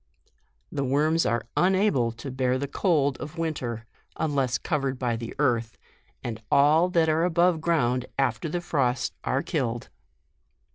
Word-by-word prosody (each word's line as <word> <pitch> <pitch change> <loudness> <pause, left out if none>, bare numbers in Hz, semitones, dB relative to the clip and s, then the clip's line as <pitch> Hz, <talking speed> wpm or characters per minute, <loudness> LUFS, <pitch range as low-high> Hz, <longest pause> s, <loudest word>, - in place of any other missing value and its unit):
The 140 - -2
worms 150 +4 +2
are 115 +2 0
unable 185 - +2
to 120 +4 -7
bear 130 0 0
the 140 +2 -3
cold 145 -4 +1
of 155 +2 -8
winter, 125 -9 -3 0.3
unless 135 -5 0
covered 135 -4 -2
by 125 -2 -1
the 115 0 -6
earth, 120 -5 0 0.5
and 115 -2 -5
all 155 +5 +5
that 170 -3 +2
are 160 +1 +2
above 175 -1 +2
ground 125 -7 +1
after 135 +6 0
frost 130 -7 0
are 130 - 0
killed. 130 -9 -2
140 Hz, 140 wpm, -26 LUFS, 125-160 Hz, 0.5 s, all